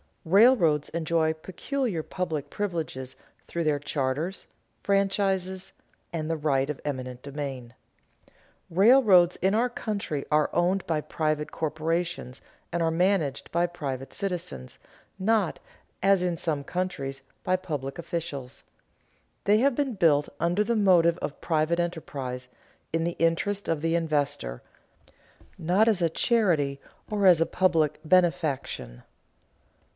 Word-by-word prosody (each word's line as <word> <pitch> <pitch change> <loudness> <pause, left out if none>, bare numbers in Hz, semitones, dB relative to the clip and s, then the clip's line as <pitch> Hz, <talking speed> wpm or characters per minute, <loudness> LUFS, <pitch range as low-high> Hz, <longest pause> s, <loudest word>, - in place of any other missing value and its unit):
Railroads 180 - +5
enjoy 160 -1 +1
peculiar 190 - -3
public 155 -6 -3
privileges 160 -10 -4 0.3
through 170 - -2
their 150 -2 +1
charters, 145 +5 -2 0.4
franchises, 195 -2 0 0.4
and 155 -1 -3
the 165 - +1
right 140 -2 +1
of 150 - -4
eminent 130 -3 -4
domain. 135 -4 -6 1.0
Railroads 190 -2 +6
in 190 +2 +1
our 240 +3 +2
country 200 -11 -3
are 150 0 +3
owned 180 +2 +1
by 155 -2 0
private 155 -1 -2
corporations 160 -2 -2 0.3
and 170 0 -1
are 165 0 +2
managed 170 -5 0
by 170 +1 +2
private 135 -6 -5
citizens, 175 - -5 0.4
not, 205 -2 +1 0.4
as 195 -1 +4
in 175 -2 0
some 150 -4 -2
countries, 140 -6 -3 0.2
by 185 - +2
public 145 -7 -4
officials. 150 -6 -5 0.8
They 210 +2 +5
have 275 +1 +3
been 280 -2 0
built 155 -7 +3
under 175 +5 +2
the 235 +2 0
motive 175 -5 +4
of 145 - -5
private 160 +1 +1
enterprise, 135 -7 -4 0.5
in 165 0 +1
the 170 +1 -2
interest 180 +5 0
of 160 -3 0
the 165 +1 0
investor, 145 - -1 1.0
not 185 +7 +2
as 210 -5 +2
a 170 - +3
charity 160 - +1 0.3
or 205 -2 0
as 175 -3 +7
a - - +5
public 165 -5 +2
benefaction. 155 - +1
165 Hz, 125 wpm, -27 LUFS, 150-185 Hz, 1.0 s, as